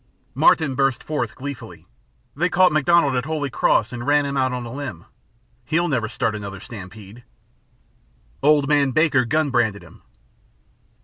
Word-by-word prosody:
Martin 150 -4 +3
burst 135 -1 0
forth, 120 -8 -3
gleefully: 140 0 -8 0.5
"They 175 +5 0
caught 185 0 +4
MacDonald 155 -1 +3
at 125 +1 -1
Holy 150 -3 -3
Cross 120 0 +1
and 120 +2 -6
ran 145 0 +3
him 140 0 -3
out 130 -1 +1
on 125 -1 -4
a 115 - -8
limb. 130 - -7 0.6
He'll 165 +6 0
never 120 -8 -1
start 115 -2 -1
another 100 -2 -7
stampede. 105 +1 -11 1.2
Old 145 -1 +3
man 145 -2 +3
Baker 145 -4 +3
gun 150 +3 0
branded 110 -5 0
him." - - -17
135 Hz, 150 wpm, -21 LUFS, 120-150 Hz, 1.2 s, caught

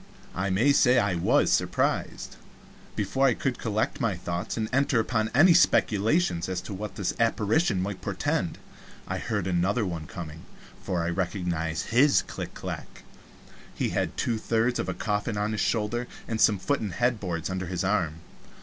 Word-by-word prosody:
I 95 +1 -1
may 115 +10 +3
say 125 -2 +5
I 100 -5 +2
was 85 - +2
surprised. - - -1 0.6
Before 135 +7 +1
I 125 - +3
could 130 -2 -2
collect 110 +5 -1
my 115 -6 +1
thoughts 85 +3 -4
and 110 -1 -1
enter 135 -2 +3
upon 110 -1 0
any 170 +6 +7
speculations 110 - +2
as 90 -1 -2
to 100 - -7
what 105 +2 -6
this 100 - -1
apparition 115 - +2
might 95 +1 -3
portend, - - -1 0.5
I - - -3
heard 105 -4 -2
another 95 +5 +1
one 85 -4 -4
coming 80 -3 -8 0.4
for 90 -4 -2
I 85 - -1
recognized 85 -3 -2
his 135 +5 +4
clack - - -7
clack. - - -7 0.7
He - - -1
had - - -2
two 115 -2 0
thirds 115 +2 0
of 95 - -2
a 90 - -2
coffin 105 0 -2
on 105 +1 0
his 110 - -1
shoulder, 120 +2 0 0.2
and 110 -1 -2
some 105 -2 +5
foot 140 +10 0
and 105 -4 -4
head 120 -2 +1
boards 85 -3 -3
under 95 -1 -3
his 90 0 -2
arm. 85 -5 0
105 Hz, 175 wpm, -27 LUFS, 90-115 Hz, 0.7 s, any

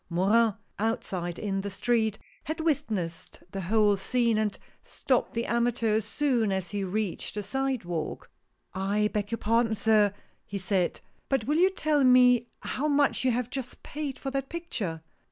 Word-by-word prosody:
Morin, 205 +5 +3 0.2
outside 185 -5 -2
in 195 -2 -2
the 200 - -4
street, 220 +2 +1 0.3
had 315 +2 -3
witnessed 230 - -2
the 195 - -4
whole 205 +2 +3
scene, 235 +4 +1
and 215 -1 0 0.2
stopped 255 -3 -1
the 230 - 0
amateur 235 -2 +1
as 220 - -2
soon^as 220 - 0
he 205 -1 -2
reached 200 +1 -3
the 210 - -2
sidewalk. 220 -11 -2 0.3
" - - -48
I 205 +2 +1
beg 205 -1 -1
your 230 - -2
pardon, 230 +1 +2
sir," 215 -1 +4 0.3
he 200 - -5
said, 185 -2 0
" - - -39
but 270 -5 +1
will 295 +3 +1
you 365 +3 +5
tell 310 -6 +1
me 250 -2 +6
how 290 +4 -2
much 285 -2 +2
you 260 - +3
have 250 0 -2
just 265 -3 -5
paid 290 -3 -5
for 270 - -4
that 270 0 -2
picture." 220 - -4
225 Hz, 170 wpm, -28 LUFS, 200-260 Hz, 0.3 s, me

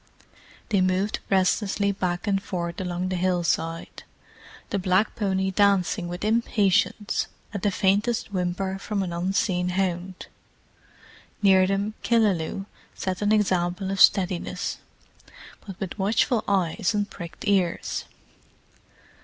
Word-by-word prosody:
They 200 -4 +2
moved 185 +3 +1
restlessly 200 +1 +2
back 180 -2 -2
and 195 -2 +1
forth 170 -2 -4
along 180 0 -2
the 185 - -1
hillside, 175 -2 -1 0.7
the 200 - 0
black 185 +3 +1
pony 190 -2 0
dancing 195 -2 +2
with 175 +3 -5
impatience 210 -2 +1 0.3
at 200 - -3
the 205 - +2
faintest 205 +3 +1
whimper 190 +1 -2
from 200 -1 -2
an 175 -2 -4
unseen 180 0 0
hound. 180 0 -2 1.2
Near 190 -2 +6
them 200 +2 -1
Killaloe 195 -5 +1 0.3
set 185 0 -3
an 205 0 +2
example 190 -2 +1
of 195 - -1
steadiness—but 185 +1 -1
with 195 +2 -5
watchful 215 +4 +2
eyes 190 0 +1
and 205 -1 0
pricked 170 -2 -9
ears. 190 -4 0
190 Hz, 115 wpm, -25 LUFS, 180-200 Hz, 1.2 s, Near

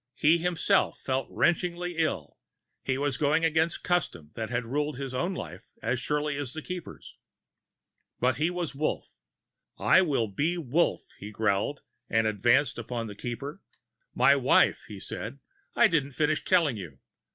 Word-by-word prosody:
He 160 +3 +4
himself 175 0 +1
felt 130 -1 -1
wrenchingly 175 +1 0
ill; 95 - -2 0.4
he 130 -1 0
was 140 -2 0
going 155 +3 +2
against 160 +1 +1
custom 120 - -1
that 110 -1 -4
had 120 0 -1
ruled 145 +3 -2
his 135 -1 -5
own 175 +9 -1
life 90 - -7 0.2
as 125 - -1
surely 150 +2 -1
as 140 -4 -4
the 160 - -6
Keeper's. 180 -2 -8 1.0
But 125 -1 +2
he 155 +4 +2
was 175 -3 -3
Wolf. 150 +3 -2 0.7
"I 185 - +5
will 145 -10 +1
be 150 - -1
Wolf," 165 +2 0
he 100 - -7
growled, 105 +5 0 0.3
and 110 0 +2
advanced 120 +7 +2
upon 120 0 -4
the 105 -2 -8
Keeper. 135 - -6 0.5
"My - - +6
wife," - - +3
he - - -8
said, - - -6 0.4
"I 235 - +6
didn't 145 -7 0
finish 150 +2 +1
telling 165 - +3
you. 85 -9 -8
145 Hz, 155 wpm, -28 LUFS, 120-165 Hz, 1.0 s, My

